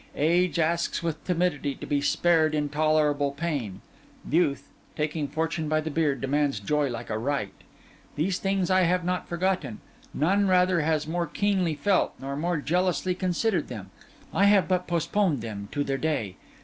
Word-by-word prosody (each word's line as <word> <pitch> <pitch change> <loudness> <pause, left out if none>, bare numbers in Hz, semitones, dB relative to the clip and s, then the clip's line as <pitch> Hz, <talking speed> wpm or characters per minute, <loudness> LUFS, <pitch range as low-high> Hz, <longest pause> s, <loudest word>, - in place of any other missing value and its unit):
Age 175 +4 +2
asks 170 +1 0
with 160 -2 -3
timidity 165 -6 0
to - - -8
be 145 -1 0
spared 160 0 +2
intolerable 150 -1 +1
pain; 140 - -3 0.5
youth, 155 -3 +1 0.2
taking 150 0 -2
fortune 160 +2 -2
by 155 0 +2
the 155 0 -4
beard, 145 -5 0
demands 140 -2 0
joy 145 +7 0
like 115 -2 -6
a 110 - -1
right. 130 -5 -2 0.6
These 180 +5 0
things 195 -2 0
I 185 0 +5
have 180 0 +1
not 180 0 -1
forgotten; 180 - -1 0.3
none, 195 +7 +2
rather, 180 -2 +3
has 155 0 0
more 170 +1 -1
keenly 185 -1 0
felt, 185 +6 +1
none 140 +2 -4
more 175 0 0
jealously 180 +4 0
considered 185 0 0
them; 100 -6 -8 0.4
I 200 - +4
have 200 -3 +5
but 180 -1 0
postponed 170 - +1
them 100 -3 -6
to 145 - -1
their 135 -1 -2
day. 125 -12 -1
160 Hz, 160 wpm, -26 LUFS, 145-180 Hz, 0.6 s, I